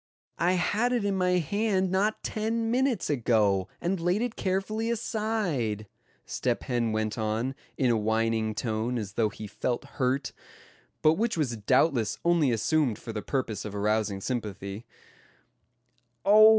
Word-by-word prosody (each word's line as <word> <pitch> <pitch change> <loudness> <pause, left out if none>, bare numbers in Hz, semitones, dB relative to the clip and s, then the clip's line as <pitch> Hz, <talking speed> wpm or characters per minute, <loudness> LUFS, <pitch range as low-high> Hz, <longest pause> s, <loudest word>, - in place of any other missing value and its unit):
"I 180 +2 +3
had 210 +7 +1
it 235 -4 +1
in 200 - +1
my 180 -1 +2
hand 190 +2 +1
not 205 +3 +1
ten 225 +1 -1
minutes 255 -4 +1
ago, 110 -8 +2
and 180 +2 -1
laid 175 +6 +1
it 245 -2 -3
carefully 200 +4 -1
aside," 210 - -1 0.4
Step - - -1
Hen 120 -3 0
went 110 0 -1
on, 110 +4 -1 0.2
in 130 -3 +3
a - - +3
whining 110 0 +1
tone 115 +2 -1
as 105 -3 -4
though 110 -1 +2
he 105 +1 -8
felt 110 +4 -2
hurt; 130 +1 -1 0.7
but 155 +4 +5
which 230 -4 +1
was 135 -7 0
doubtless 110 +1 +2
only 170 -5 +4
assumed 125 +1 +1
for 115 - -7
the 105 - -3
purpose 125 -5 -2
of 105 -1 -6
arousing 105 -1 0
sympathy; 105 -2 -4 1.4
"oh! 215 +2 +9
130 Hz, 150 wpm, -28 LUFS, -, 1.4 s, oh